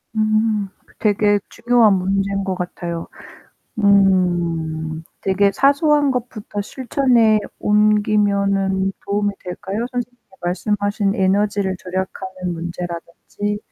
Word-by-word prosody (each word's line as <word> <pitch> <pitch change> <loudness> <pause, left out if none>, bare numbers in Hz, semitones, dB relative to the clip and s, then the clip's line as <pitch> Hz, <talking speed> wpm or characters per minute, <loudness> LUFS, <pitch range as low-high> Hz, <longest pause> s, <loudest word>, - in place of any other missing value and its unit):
음. 215 -1 +1 0.3
되게 205 -1 +3
중요한 235 -3 +3
문제인 195 +1 0
것 190 -1 -2
같아요. 175 -2 -5 0.8
음 170 -5 +2 0.2
되게 200 +1 +2
사소한 285 0 +3
것부터 225 -4 -4
실천에 240 -2 +2 0.2
옮기면은 200 -2 +2
도움이 205 0 0
될까요? 190 +5 -4
선생님께서 245 -5 -6
말씀하신 205 +2 0
에너지를 195 0 +1
절약하는 185 0 -4
문제라든지 175 +4 -5
200 Hz, 250 characters per minute, -20 LUFS, 185-215 Hz, 0.8 s, 되게